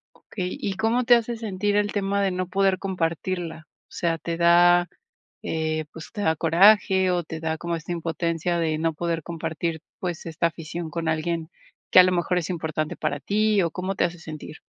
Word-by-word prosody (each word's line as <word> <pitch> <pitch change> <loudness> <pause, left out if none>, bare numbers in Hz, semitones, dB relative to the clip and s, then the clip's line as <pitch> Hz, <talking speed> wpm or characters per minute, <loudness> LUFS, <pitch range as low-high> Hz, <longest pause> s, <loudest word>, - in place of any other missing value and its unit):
Okey. 185 -3 -5
¿Y 195 - -2
cómo 225 +5 +1
te 240 - +7
hace 235 0 0
sentir 205 -2 -1
el 205 0 +1
tema 200 0 0
de 195 - +2
no 185 0 -3
poder 195 0 +2
compartirla? 170 -3 -3 0.2
O - - -27
sea, 165 -1 -1
¿te 165 +1 -4
da, 175 +1 +5 0.5
eh, 155 -1 -2
pues, 160 - -10
te 205 - -4
da 160 -4 +2
coraje, 190 +3 +5
o 175 -1 +1
te 160 0 -7
da 160 0 -2
como 170 0 -2
esta 165 +2 -6
impotencia 170 +1 -1
de 160 -2 0
no 165 +1 0
poder 165 0 -2
compartir, 165 0 -3 0.2
pues, 175 -3 -4
esta 165 +1 0
afición 165 0 -6
con 165 +1 -3
alguien 160 +1 -1 0.4
que - - +7
a - - +10
lo 185 - +2
mejor 180 0 +1
es 175 +1 -4
importante 155 -3 -3
para 145 0 -2
ti, 210 +5 +2
o 170 - 0
cómo 185 +4 -3
te - - +1
hace 175 0 -2
sentir? 155 -1 -9
170 Hz, 200 wpm, -24 LUFS, 160-190 Hz, 0.5 s, a